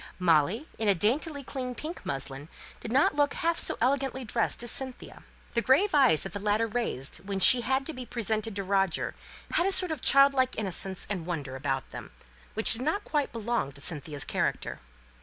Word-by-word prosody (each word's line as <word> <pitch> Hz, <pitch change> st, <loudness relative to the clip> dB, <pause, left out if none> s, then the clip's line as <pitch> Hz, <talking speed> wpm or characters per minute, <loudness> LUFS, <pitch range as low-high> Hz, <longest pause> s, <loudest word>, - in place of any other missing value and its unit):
Molly, 180 Hz, -, +2 dB
in 220 Hz, -, -1 dB
a 200 Hz, -, +4 dB
daintily 280 Hz, -, 0 dB
clean 255 Hz, -1 st, -5 dB
pink 320 Hz, +6 st, -7 dB
muslin, 135 Hz, +2 st, -5 dB, 0.3 s
did 225 Hz, -, -7 dB
not 275 Hz, +4 st, +3 dB
look 290 Hz, -1 st, +1 dB
half 335 Hz, 0 st, 0 dB
so -, -, +2 dB
elegantly 265 Hz, +1 st, 0 dB
dressed 230 Hz, +1 st, -1 dB
as 240 Hz, -, -1 dB
Cynthia. 260 Hz, -2 st, -4 dB, 0.3 s
The 235 Hz, -, +2 dB
grave 290 Hz, -, +3 dB
eyes 265 Hz, -, +5 dB
that 195 Hz, -, -7 dB
the 205 Hz, -, -4 dB
latter 210 Hz, +2 st, +1 dB
raised 220 Hz, -, -3 dB
when 195 Hz, 0 st, -4 dB
she 240 Hz, +6 st, +8 dB
had 265 Hz, +2 st, 0 dB
to 320 Hz, -, -4 dB
be 255 Hz, -2 st, -8 dB
presented 220 Hz, -2 st, -2 dB
to 200 Hz, -, -2 dB
Roger 195 Hz, -3 st, 0 dB, 0.4 s
had 350 Hz, -, +2 dB
a -, -, +1 dB
sort 365 Hz, -3 st, +1 dB
of 310 Hz, -6 st, -4 dB
child 275 Hz, +1 st, +5 dB
like 260 Hz, -1 st, 0 dB
innocence 190 Hz, -2 st, -1 dB
and 185 Hz, -5 st, -4 dB
wonder 145 Hz, -7 st, -4 dB
about 135 Hz, -1 st, -3 dB
them, -, -, -8 dB, 0.5 s
which 220 Hz, -, +5 dB
did 230 Hz, -, -4 dB
not 320 Hz, +10 st, -1 dB
quite 295 Hz, -2 st, -1 dB
belong 230 Hz, -, -2 dB
to 140 Hz, -, -12 dB
Cynthia's 145 Hz, -2 st, -3 dB
character. -, -, -2 dB
230 Hz, 195 wpm, -28 LUFS, 185-270 Hz, 0.5 s, she